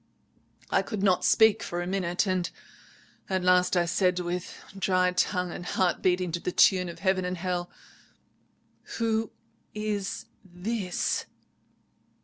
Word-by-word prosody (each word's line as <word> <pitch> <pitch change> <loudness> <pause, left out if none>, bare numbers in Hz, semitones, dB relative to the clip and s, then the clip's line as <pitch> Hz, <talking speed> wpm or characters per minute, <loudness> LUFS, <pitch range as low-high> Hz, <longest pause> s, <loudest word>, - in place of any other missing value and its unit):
I - - +4
could 210 -4 -4
not 185 -3 +3
speak 220 -1 +5
for 175 - -4
a 175 - -2
minute. 180 0 0 1.0
At 190 -1 0
last 180 0 +4
I 175 - +3
said, 180 +1 +1
with 180 0 -4 0.2
dry 185 -1 +2
tongue, 180 0 0
and 175 - -6
heart 180 0 0
beating 180 -1 +1
to 170 - -2
the 180 - -3
tune 180 -1 +4
of 170 - -8
heaven 190 -1 +1
and 180 0 -3
hell— 180 0 -2 1.3
"'Who 225 -1 0 0.5
is 210 -2 -3 0.2
this?' 190 +1 -2
185 Hz, 130 wpm, -27 LUFS, 180-195 Hz, 1.3 s, speak